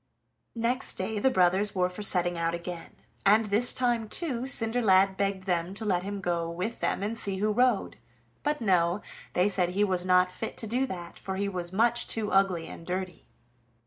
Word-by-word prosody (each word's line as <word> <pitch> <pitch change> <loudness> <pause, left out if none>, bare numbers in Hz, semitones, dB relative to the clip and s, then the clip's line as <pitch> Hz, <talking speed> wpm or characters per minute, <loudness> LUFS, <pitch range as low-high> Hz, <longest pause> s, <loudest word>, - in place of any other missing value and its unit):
Next 235 +3 0
day 205 +3 -3
the 265 - +3
brothers 190 0 +2
were 180 -1 +2
for 180 +3 -8
setting 175 -3 +5
out 165 0 -1
again, 170 0 -8 0.3
and 215 +3 +4
this 210 +4 +2
time 240 -3 0
too 260 -6 -2
Cinderlad 220 -6 +2
begged 195 -1 -2
them 180 0 -2
to 220 +2 -6
let 180 -4 +1
him 200 +1 -5
go 170 -2 -1
with 185 +7 -4
them - - -1
and 225 +2 -2
see 195 -3 +2
who 210 +2 0
rode; 245 -2 +1 0.4
but 295 -2 -1
no, 180 -2 +2 0.3
they 180 +2 +3
said 185 -3 +1
he 195 +3 0
was 185 -3 0
not 180 0 +3
fit 225 - -6
to - - 0
do 250 +5 0
that, 175 -6 -8
for 190 - -5
he 200 +1 -1
was 180 -3 -5
much 235 +4 +2
too 215 -2 -1
ugly 190 -4 +2
and 165 - -10
dirty. 185 0 -5
195 Hz, 195 wpm, -28 LUFS, 180-225 Hz, 0.4 s, setting